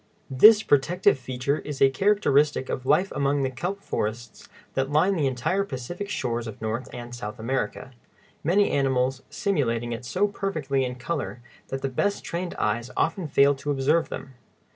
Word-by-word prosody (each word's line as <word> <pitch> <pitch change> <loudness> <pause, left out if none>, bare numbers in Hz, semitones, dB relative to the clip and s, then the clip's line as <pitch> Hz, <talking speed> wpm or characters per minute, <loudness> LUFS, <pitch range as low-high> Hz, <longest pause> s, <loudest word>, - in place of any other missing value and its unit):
] - - -37
This 215 0 +9
protective 145 0 +3
feature 130 +3 -2
is 145 -3 -6
a 135 - +5
characteristic 150 -6 +2
of 130 - -4
life 180 +7 +3
among 140 0 0
the 130 - -1
kelp 180 +10 -4
forests 115 - -4 0.2
that 135 0 0
line 180 +7 +3
the 150 -5 +1
entire 135 +10 0
Pacific 175 +5 -6
shores 120 - -2
of 110 - -8
North 110 +3 -3
and 120 0 -8
South 120 -1 -6
America, 130 +2 -3 0.5
many 195 +6 +3
animals 130 -1 +1
simulating 120 - -1
it 115 +1 -5
so 185 +11 +1
perfectly 155 -10 -1
in 125 0 -4
color 130 -2 -4 0.2
that 135 0 -5
the - - +1
best 200 +10 -1
trained 175 +1 -4
eyes 115 +3 -1
often 185 -5 0
fail 140 0 +4
to 140 +1 -6
observe 145 +4 +2
them. 135 - -7
135 Hz, 170 wpm, -25 LUFS, 125-170 Hz, 0.5 s, This